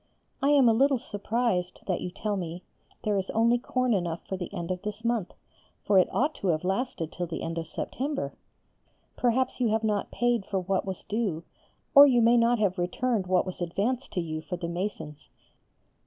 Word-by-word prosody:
I 275 - +3
am 280 -4 +6
a 225 - +6
little 270 +4 +3
surprised 205 -4 -2
that 185 - -1
you - - -3
tell 205 +3 -3
me 175 -1 -5 0.4
there 205 -2 +1
is 190 - -4
only 235 +2 +4
corn 255 0 0
enough 170 -4 -2
for 190 - -3
the 180 -2 -6
end 170 +1 -4
of 180 -1 -3
this 210 +2 -6
month, 230 -6 0 0.5
for 200 -2 +5
it 185 - +3
ought 295 +4 +1
to 195 - -3
have 160 -2 +1
lasted 190 -4 -2
till 175 -1 -4
the 165 - -5
end 165 0 -3
of 165 - -6
September. 280 - -3 0.8
Perhaps 255 +2 +1
you 245 - +2
have 220 +1 +1
not 210 -2 0
paid 240 -3 +1
for 195 0 -2
what 190 +1 -1
was 190 -2 -5
due, 200 -7 -2 0.5
or 285 0 +10
you 250 -3 +4
may 235 +1 +6
not 235 +1 +4
have 200 -4 0
returned 195 +3 0
what 185 0 +2
was 185 -1 -7
advanced 215 +10 -1
to 180 - 0
you 155 -1 -4
for 180 +3 -5
the 170 -1 -4
masons. 170 -4 -5
205 Hz, 200 wpm, -28 LUFS, 180-240 Hz, 0.8 s, or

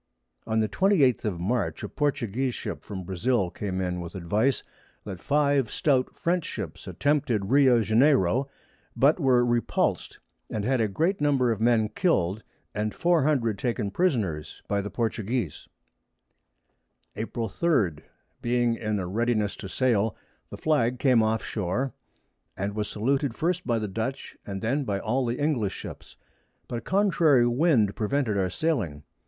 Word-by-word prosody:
On 110 0 +1
the 110 - +1
28_th_ 145 - +2
of 95 -5 -2
March 95 -3 -1
a - - -2
Portuguese 130 -3 -1
Ship 90 -9 -5
from 95 0 -7
Brasile 95 +2 0
came 95 -2 -4
in 90 -1 -2
with 85 +1 -8
advice, 105 +8 0 0.4
that 95 -4 -7
5 140 -4 +2
Stout 130 -4 +1
French 175 0 0
Ships - - -6
attempted 130 -8 0
Rio 130 -4 +5
Janiero, 125 - +3 0.5
but 145 +6 +4
were 125 -4 +4
repuls'd, 120 -1 0 0.3
and 105 -2 -3
had 130 -1 +2
a 110 - +2
great 165 - 0
Number 135 -5 +3
of 110 -1 -3
Men 115 -2 +3
kill'd, 105 - 0 0.3
and 105 0 -2
400 145 - +2
taken 115 -4 -1
Prisoners 105 - -1
by 100 0 0
the 100 - -5
Portuguese. 110 - -2 1.5
April 115 +1 -3
3. 105 - +1 0.4
Being 120 0 +1
in 105 -2 -2
a 95 - -2
readiness 110 +1 0
to 95 - -7
sail, 115 -4 +1 0.3
the - - -8
Flag 125 -6 +1
came 125 -4 +4
off 110 +1 0
Shore, 110 +7 -2 0.8
was 105 0 -2
saluted 135 +3 0
first 175 +2 -1
by 120 -2 +2
the 110 -1 -2
Dutch, 110 +7 -4
and 95 0 -5
then 135 +6 0
by 100 -6 -1
all 125 +5 0
the 120 +1 -1
English 140 -10 0
Ships; - - -9 0.5
but 120 - -3
a - - -13
contrary 165 -10 +3
Wind 120 - +2
prevented 115 0 0
our 95 -2 +1
sailing. 100 - -1
115 Hz, 150 wpm, -26 LUFS, 105-135 Hz, 1.5 s, Rio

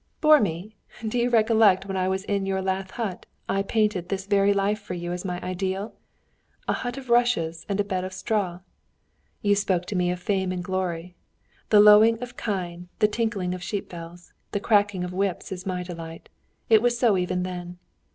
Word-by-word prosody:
"Bore 305 -1 +7
me! 200 +2 -3 0.3
Don't 220 -1 -4
you 245 0 +2
recollect 220 -4 +4
when 195 -1 -4
I 185 -1 0
was 190 0 -1
in 200 -1 -1
your 190 0 0
lath 190 0 -2
hut 215 -6 -5 0.2
I 195 - +1
painted 200 -3 0
this 195 -1 -3
very 200 0 +3
life 205 +1 0
to 180 - -3
you 175 0 -4
as 180 - -5
my 180 -2 -3
ideal? 190 +3 -3 0.7
A - - +2
hut 245 +1 -4
of 260 -3 -7
rushes 225 -10 +2
and 200 0 -1
a - - +4
bed 190 -2 -2
of 185 - -5
straw. 190 -3 -2 0.8
You 205 -1 +4
spoke 185 -3 0
to 205 - -5
me 180 -1 +1
of 180 0 -2
fame 190 0 -1
and 180 -1 -3
glory. 180 -2 -3 0.6
The 210 - +6
lowing 215 +2 +7
of 245 0 -7
kine, 180 -4 -4
the 210 - +4
tinkling 210 -5 -1
of 185 - -6
sheep 200 +2 -4
bells, 170 0 -10 0.2
the 205 - 0
cracking 205 -3 +2
of 180 0 -5
whips 195 -1 -2
is 185 +1 -6
my 180 -1 -2
delight. 165 -2 -9 0.4
It 220 -2 +6
was 240 0 +2
so 235 -4 +3
even 180 0 -1
then. 180 -1 -6
195 Hz, 200 wpm, -25 LUFS, 180-210 Hz, 0.8 s, Bore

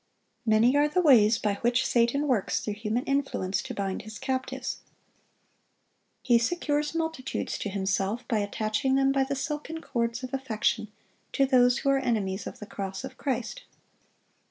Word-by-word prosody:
Many 225 +4 +4
are 290 +1 +4
the 360 +5 0
ways 235 -10 +6
by 205 -3 -1
which 245 +2 +2
Satan 240 +5 +2
works 240 -8 +1
through 210 - -3
human 215 +3 -2
influence 270 -9 -1
to - - -6
bind 195 -1 -2
his 215 +1 -9
captives. 260 0 -3 1.4
He 240 -2 +4
secures 295 +3 -1
multitudes 320 -5 -2
to 205 - -3
himself 195 +3 -1
by 225 -4 +1
attaching 215 +6 0
them 270 0 +3
by 275 0 +2
the 280 +1 -2
silken 300 +3 -4
cords 235 -4 -2
of 255 - -6
affection 225 -4 -1 0.4
to 275 - +3
those 250 -2 +4
who 275 - 0
are 275 0 +4
enemies 210 -7 -1
of - - -8
the 210 - -8
cross 195 +1 -5
of 265 -1 -7
Christ. 250 -5 -3
245 Hz, 160 wpm, -27 LUFS, 215-275 Hz, 1.4 s, ways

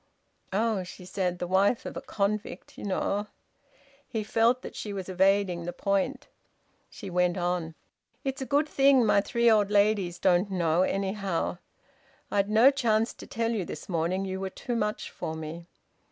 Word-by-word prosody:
"Oh!" 215 0 +1
she 180 0 -11
said. 180 -1 -2
"The 175 - -3
wife 195 +6 +2
of - - -6
a - - -4
convict... 200 -2 -3
you - - -8
know!" 205 +1 -1 0.8
He 220 -2 -3
felt 230 +4 +2
that - - -8
she 210 - -5
was 190 -2 -5
evading 190 -2 +2
the 175 - -4
point. 200 +7 -1 0.6
She 200 -5 -9
went 180 0 +2
on: 175 -2 -2 0.5
"It's 270 -1 -3
a 265 - -3
good 290 +2 +2
thing 270 -4 +4
my 200 -1 +4
three 235 +3 +1
old 210 -3 +5
ladies 200 -4 +2
don't 180 +2 +2
know, 170 -3 +1
anyhow...! 195 -2 -1 0.7
I'd 200 0 +1
no 225 +6 +6
chance 230 -5 +1
to - - -12
tell 230 0 -1
you 215 -5 -1
this - - -8
morning. 180 +2 -1
You 190 0 -4
were 190 0 -3
too 240 +5 -5
much 210 -2 -2
for 160 - -5
me." 160 +2 -7
200 Hz, 170 wpm, -28 LUFS, 180-220 Hz, 0.8 s, no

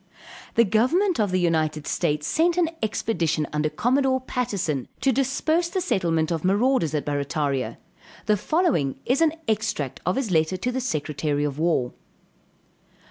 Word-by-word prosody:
The 230 - +6
government 255 - +2
of 210 -2 +2
the 185 0 +1
United 155 -3 0
States 150 0 -1
sent 335 - +2
an 335 -2 +2
expedition 175 -8 0
under 150 0 0
Commodore 260 - +1
Patterson, 200 - -2
to 270 - +2
disperse 300 +6 +1
the 375 - -1
settlement 170 - 0
of 165 -2 -2
marauders 200 - +2
at 150 - -1
Barrataria; 145 -2 -1 0.5
the 210 - +3
following 210 - 0
is 260 +5 +1
an 320 -2 +4
extract 215 - -1
of 180 +2 0
his 255 -7 -2
letter 160 +2 +2
to 245 +7 -2
the 260 +1 -2
secretary 150 - -1
of 145 0 -3
war. 160 -7 +1
190 Hz, 150 wpm, -24 LUFS, -, 0.5 s, The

